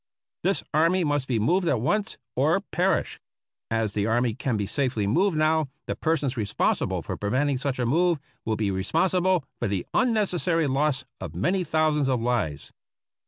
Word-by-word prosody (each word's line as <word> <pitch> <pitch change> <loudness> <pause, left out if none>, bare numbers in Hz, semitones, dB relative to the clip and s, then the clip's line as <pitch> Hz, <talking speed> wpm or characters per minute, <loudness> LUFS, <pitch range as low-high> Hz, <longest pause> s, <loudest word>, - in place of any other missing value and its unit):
This - - 0
army 165 +4 +3
must 145 -3 0
be 120 - 0
moved 175 - +2
at 125 - +2
once, 205 - 0 0.2
or 155 +9 +2
perish. 190 -2 0 0.5
As 115 -2 0
the 105 0 0
army 120 +1 +1
can 125 -1 -2
be 100 - -1
safely 125 -3 -1
moved 170 - +2
now, 155 -1 +2 0.2
the - - -3
persons 150 -5 0
responsible 105 -4 0
for - - -4
preventing 130 +6 0
such 135 -1 -2
a 125 - 0
move 170 +7 +2 0.3
will 110 - -1
be 105 -2 0
responsible 175 - +1
for - - 0
the 100 -3 -2
un 250 - +3
necessary 180 -6 +1
loss 140 0 0
of 80 - -7
many 180 - +1
thousands 155 -3 +1
of 130 -2 +1
lives. 115 - -2
140 Hz, 170 wpm, -26 LUFS, 115-170 Hz, 0.5 s, army